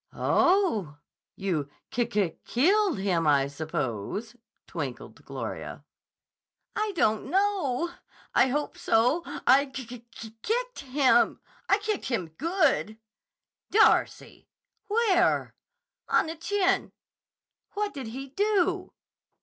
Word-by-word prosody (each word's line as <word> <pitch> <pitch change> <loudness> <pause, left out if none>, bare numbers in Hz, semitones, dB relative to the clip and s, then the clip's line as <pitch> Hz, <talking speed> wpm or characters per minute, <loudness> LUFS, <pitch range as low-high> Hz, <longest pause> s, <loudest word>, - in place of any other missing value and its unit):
"Oh! 285 - +2 0.4
You 170 -8 -2 0.2
ki 240 -1 0
ki 205 -7 -1
killed 380 - +2
him, 180 -5 0
I 140 -2 +4
suppose," 150 - -4 0.3
twinkled - - -6
Gloria. - - -6 0.9
"I 425 0 0
don't 220 -9 +1
know. 360 -6 +1 0.4
I - - +5
hope 290 +3 -2
so. 245 +9 +3 0.2
I 280 +2 +5
ki 265 -1 -7
ki 245 +1 -9 0.4
kicked - - -2
him. 260 -3 +3 0.3
I 395 - +5
kicked 425 -1 -3
him 220 -10 -2
good!" 290 - 0 0.7
"Darcy! 440 +1 +2 0.4
Where?" 410 -5 +2 0.6
"On - - +3
the 320 +1 -5
chin." 385 +3 0 0.8
"What 415 0 -1
did 270 -4 -6
he 265 +4 -7
do?" 375 +1 0
275 Hz, 105 wpm, -27 LUFS, -, 0.9 s, I